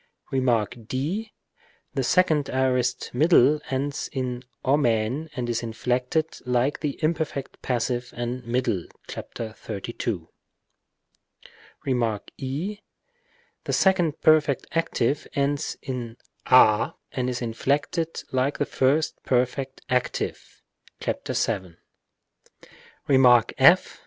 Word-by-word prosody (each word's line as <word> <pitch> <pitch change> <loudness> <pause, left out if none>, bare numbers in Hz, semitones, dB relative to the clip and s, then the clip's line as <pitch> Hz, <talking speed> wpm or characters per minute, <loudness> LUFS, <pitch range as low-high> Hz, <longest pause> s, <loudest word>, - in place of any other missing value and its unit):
Rem. 125 -5 +2 0.2
d. 180 - -2 0.6
The - - 0
second 155 -6 +3
aorist 130 -1 0
middle 150 +1 +5
ends 140 +1 -2
in 125 -2 -3 0.2
ou 140 +3 +3
and 120 +4 -1
is 115 -1 -1
inflected 125 +7 -1
like 125 +3 +1
the 145 -2 -3
imperfect 155 -3 -2
passive 120 0 -1
and 120 +1 -3
middle 115 -6 -1 0.2
(§ 110 -1 -7
32). 100 -4 -4 1.6
Rem. 120 -5 +1 0.2
6. 165 +11 -4 0.8
The - - -2
second 175 -5 +3
perfect 150 -4 +4
active 150 -4 0
ends 140 0 0
in 120 -3 -5 0.3
a 110 -4 +6 0.2
and 125 -2 -1
is 125 -1 -2
inflected 145 +8 -1
like 130 +2 0
the 145 - 0
first 145 +4 +1
perfect 130 +1 0
active 125 -2 -2 0.4
(§ - - -3
7). 95 -6 -1 1.3
Rem. 125 -4 +6 0.2
f. - - +5
130 Hz, 100 wpm, -25 LUFS, 120-145 Hz, 1.6 s, a